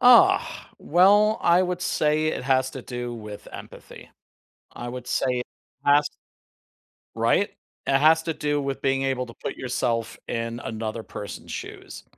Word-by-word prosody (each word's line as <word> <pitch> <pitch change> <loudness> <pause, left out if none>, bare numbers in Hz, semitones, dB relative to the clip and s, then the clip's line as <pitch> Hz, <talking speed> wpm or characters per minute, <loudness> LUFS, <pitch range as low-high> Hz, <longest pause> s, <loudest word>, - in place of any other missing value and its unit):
Ah! 370 +10 +5
Well, 205 +4 +4
I 175 +2 +4
would 180 -1 -2
say 155 -3 +1
it - - -2
has 130 0 +2
to 130 -2 -8
do 120 -1 -5
with 105 -2 -9
empathy. - - -11 0.6
I 120 0 -6
would 125 0 -7
say 125 -1 0
it 125 - -4 0.4
has 145 +1 +5 1.1
Right? - - +2 0.4
It 135 - +3
has 160 +2 +5
to 165 0 -2
do 145 -1 -1
with 140 -1 -3
being 135 0 +1
able 130 -1 0
to 115 - -11
put - - -6
yourself 120 -2 -2
in 115 0 -3
another 110 0 -4
person's 105 - -8
shoes. - - -8
135 Hz, 155 wpm, -25 LUFS, 120-160 Hz, 1.1 s, Ah